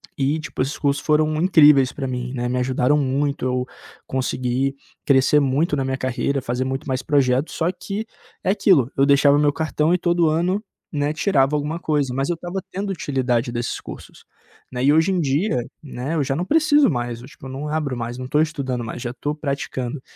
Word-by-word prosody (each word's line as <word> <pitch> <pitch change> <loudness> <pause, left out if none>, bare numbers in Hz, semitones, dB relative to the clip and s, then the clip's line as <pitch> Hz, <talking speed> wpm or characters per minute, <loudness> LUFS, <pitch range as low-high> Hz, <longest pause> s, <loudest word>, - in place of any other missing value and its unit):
e 140 +3 0
tipo, 155 - -5
esses 135 +3 -2
cursos 140 -1 0
foram 155 0 +2
incríveis 150 -7 +6
pra 135 -2 -4
mim, 125 0 -4
né. 120 0 -2
Me 125 +1 -1
ajudaram 130 +2 +2
muito, 140 0 -1
eu 125 0 -1 0.4
consegui 130 +1 -1 0.3
crescer 140 +2 +4
muito 145 +4 +1
na 135 - -1
minha 130 0 -2
carreira, 130 +2 -1
fazer 125 0 -2
muito 135 +2 -4
mais 130 -1 -1
projetos, 140 -1 +1
só 170 +2 0
que 200 +3 -5 0.4
é - - +2
aquilo, 180 - +3
eu 135 +1 +3
deixava 140 0 +5
o - - +2
meu 145 -1 +4
cartão 155 +1 0
e 180 - +4
todo 175 -2 +2
ano, 180 +7 0 0.3
né, 145 0 0
tirava 150 -5 +2
alguma 150 +3 -2
coisa, 145 -6 0
mas 135 +1 -1
eu 175 - +1
estava 175 +3 -5
tendo 195 +2 -4
utilidade 130 -8 -1
desses 120 0 -3
cursos, - - -11 0.5
né? 125 0 -3
E 140 - +5
hoje 160 +4 +3
em 185 -2 +1
dia, 140 - 0 0.2
né, 140 +1 -5
eu 150 - +1
já 135 0 -1
não 175 - -1
preciso 300 0 +4
mais, 120 -1 -3
tipo, 130 +2 -13
eu - - -8
não 140 +3 -5
abro 150 -4 -1
mais, 120 +1 -5
não 130 0 -6
tô 150 +3 +2
estudando 140 -6 -2
mais, 115 +2 -6
já 120 0 -4
tô 145 +4 -3
praticando, 140 -3 -4
140 Hz, 205 wpm, -22 LUFS, 130-155 Hz, 0.5 s, incríveis